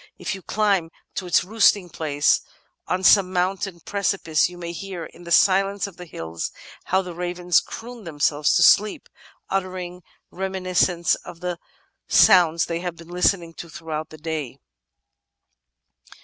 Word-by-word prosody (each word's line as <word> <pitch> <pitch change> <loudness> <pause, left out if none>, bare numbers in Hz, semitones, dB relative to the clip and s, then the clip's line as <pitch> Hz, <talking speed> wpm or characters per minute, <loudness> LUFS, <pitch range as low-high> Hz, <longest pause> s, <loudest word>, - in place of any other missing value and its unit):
If - - -3
you 190 - -7
climb 200 -5 +1 0.2
to 185 - -4
its 170 - +3
roosting 200 -1 +3
place 145 -2 +1 0.5
on 185 +1 -1
some 190 -1 +6
mountain 185 0 -1
precipice 190 -5 0
you 180 - -12
may 170 -1 -5
hear 175 0 -6
"in 175 - -14
the 170 - -8
silence 195 +2 +3
of 200 -3 -10
the 180 -1 -10
hills 80 - -5 0.3
how 190 +1 +1
the 180 -1 -7
ravens 175 0 +1
croon 235 0 -9
themselves 145 -2 +1
to - - +5
sleep, 210 +1 +4 0.4
uttering 185 -2 -3 0.3
reminiscences 185 -2 0
of 170 - -11
the 180 -1 -3 0.5
soimds 170 -3 +5
they 170 0 -3
have 175 -1 -4
been 170 0 -14
listening 175 -1 +1
to 170 - -9
throughout 160 -1 -5
the 155 - -12
day." 150 -5 -5
180 Hz, 150 wpm, -23 LUFS, 165-190 Hz, 0.5 s, some